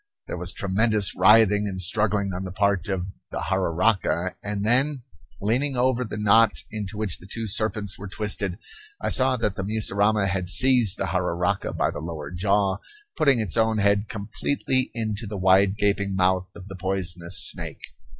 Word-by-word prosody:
There -, -, -6 dB
was 90 Hz, +1 st, -1 dB
tremendous 105 Hz, +1 st, +1 dB
writhing 105 Hz, +1 st, +5 dB
and 95 Hz, -2 st, -5 dB
struggling 100 Hz, +1 st, +1 dB
on 90 Hz, +1 st, -5 dB
the 95 Hz, -, -6 dB
part 100 Hz, -1 st, 0 dB
of 95 Hz, -2 st, -2 dB, 0.2 s
the -, -, -6 dB
jararaca; 95 Hz, 0 st, 0 dB
and 105 Hz, 0 st, -3 dB
then, 130 Hz, +3 st, +1 dB, 0.4 s
leaning 130 Hz, +7 st, 0 dB
over 125 Hz, 0 st, +1 dB
the 105 Hz, -2 st, -6 dB
knot 105 Hz, +2 st, +4 dB, 0.2 s
into 105 Hz, -1 st, -6 dB
which 105 Hz, -5 st, -3 dB
the 95 Hz, -, -14 dB
two 115 Hz, +3 st, -4 dB
serpents 105 Hz, -1 st, -1 dB
were 100 Hz, -, -7 dB
twisted, 100 Hz, -2 st, -1 dB, 0.4 s
I -, -, -2 dB
saw 130 Hz, 0 st, +4 dB
that 105 Hz, -4 st, -1 dB
the 100 Hz, -, -5 dB
mussurama 105 Hz, 0 st, +1 dB
had 95 Hz, -2 st, -2 dB
seized 125 Hz, -3 st, +5 dB
the -, -, -2 dB
jararaca 90 Hz, +1 st, -1 dB
by -, -, +1 dB
the -, -, -7 dB
lower 80 Hz, -3 st, -7 dB
jaw, 100 Hz, +1 st, 0 dB, 0.4 s
putting 140 Hz, -7 st, +3 dB
its 105 Hz, -6 st, -1 dB
own 110 Hz, -1 st, +2 dB
head 100 Hz, +1 st, +1 dB
completely 130 Hz, +5 st, -2 dB
into 110 Hz, -1 st, -3 dB
the 105 Hz, 0 st, -6 dB
wide 95 Hz, +1 st, +3 dB
gaping 100 Hz, -1 st, 0 dB
mouth 95 Hz, 0 st, +1 dB
of 95 Hz, -2 st, -11 dB
the 95 Hz, -, -8 dB
poisonous 90 Hz, -2 st, -3 dB
snake. -, -, -7 dB
100 Hz, 170 wpm, -24 LUFS, 95-110 Hz, 0.4 s, writhing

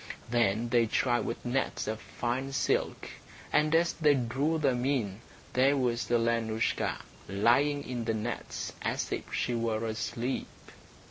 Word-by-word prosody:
Then 115 Hz, -1 st, +2 dB
they 120 Hz, -1 st, +4 dB
tried 120 Hz, +2 st, +1 dB
with 115 Hz, -, -4 dB
nets 130 Hz, +2 st, -1 dB
of 110 Hz, 0 st, -3 dB
fine 130 Hz, +3 st, -3 dB
silk, 125 Hz, -, 0 dB, 0.5 s
and, 155 Hz, +1 st, +4 dB
as 170 Hz, +1 st, +3 dB
they 150 Hz, -3 st, +4 dB
drew 135 Hz, +6 st, 0 dB
them 130 Hz, -5 st, +1 dB
in, 115 Hz, -7 st, 0 dB, 0.3 s
there 135 Hz, +3 st, +4 dB
was 120 Hz, -2 st, 0 dB
Alenoushka 115 Hz, -1 st, +1 dB, 0.3 s
lying 125 Hz, +9 st, +3 dB
in 120 Hz, -2 st, -3 dB
the 115 Hz, -1 st, 0 dB
nets 110 Hz, +2 st, -4 dB
as -, -, -2 dB
if -, -, -4 dB
she 125 Hz, -, 0 dB
were 115 Hz, -1 st, 0 dB
asleep. 115 Hz, +3 st, -2 dB
120 Hz, 140 wpm, -30 LUFS, 115-135 Hz, 0.5 s, they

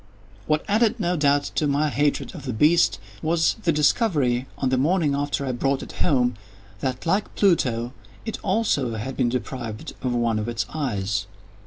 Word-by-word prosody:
What 150 Hz, 0 st, +1 dB
added, 225 Hz, +3 st, +2 dB
no 180 Hz, -2 st, 0 dB
doubt, 145 Hz, -2 st, +3 dB
to 150 Hz, -, +1 dB
my 145 Hz, +2 st, +1 dB
hatred 145 Hz, +1 st, 0 dB
of 150 Hz, -6 st, -9 dB
the 130 Hz, -, -2 dB
beast, 150 Hz, -, +4 dB, 0.2 s
was 165 Hz, +4 st, +2 dB
the 170 Hz, -, +2 dB
discovery, 145 Hz, -, +2 dB
on 135 Hz, -, 0 dB
the 130 Hz, -, +2 dB
morning 155 Hz, 0 st, +2 dB
after 140 Hz, 0 st, -1 dB
I 130 Hz, -, -1 dB
brought 135 Hz, +2 st, 0 dB
it -, -, -9 dB
home, 125 Hz, -3 st, +2 dB, 0.5 s
that, 130 Hz, -, -3 dB
like 195 Hz, +5 st, 0 dB
Pluto, 125 Hz, -, +2 dB, 0.3 s
it 225 Hz, -, -4 dB
also 150 Hz, -, +1 dB
had 120 Hz, +5 st, -4 dB
been 120 Hz, -, +1 dB
deprived 120 Hz, -3 st, -5 dB
of 125 Hz, -1 st, -1 dB
one 115 Hz, -2 st, +1 dB
of 110 Hz, +2 st, -3 dB
its 115 Hz, -1 st, -2 dB
eyes. 105 Hz, -10 st, -2 dB
140 Hz, 175 wpm, -24 LUFS, 125-165 Hz, 0.5 s, beast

